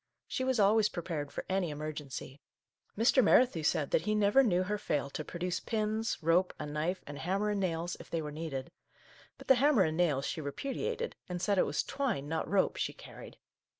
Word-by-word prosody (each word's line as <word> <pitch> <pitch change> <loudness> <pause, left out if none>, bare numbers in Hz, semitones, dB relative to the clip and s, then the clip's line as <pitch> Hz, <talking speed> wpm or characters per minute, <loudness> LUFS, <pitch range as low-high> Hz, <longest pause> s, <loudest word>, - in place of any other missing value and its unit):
She 260 - -2
was 260 -2 +1
always 210 +1 +4
pre 175 - -5
pared 150 -5 -4
for - - -5
any 190 -2 0
emergency. 145 -2 -6 0.6
Mr. 240 +4 +5
Merrithew 240 -6 +4
said 150 -1 +1
that - - +3
he 215 +5 0
never 210 +5 +5
knew 185 -8 +2
her 210 +2 -2
fail 145 -7 -1
to 155 - -4
produce 175 +3 -3
pins, 220 0 -1
rope, 175 +3 +3
a 150 - -5
knife, 155 +5 -2
and 145 0 -8
hammer 200 +4 0
and 205 - -1
nails, 175 -2 -1
if - - -12
they 165 - -1
were 150 - -5
needed. 145 -4 -5 0.7
But - - -13
the - - +8
hammer 280 -8 +5
and 160 -2 -1
nails 150 -6 +2
she 160 - -3
repudiated, 435 - -3
and 180 0 -3
said 200 +1 +1
it - - +3
was 145 - 0
twine, 240 - -2
not 160 +1 -2
rope, 195 +1 +2
she - - -1
carried - - -12
180 Hz, 205 wpm, -32 LUFS, 155-210 Hz, 0.7 s, the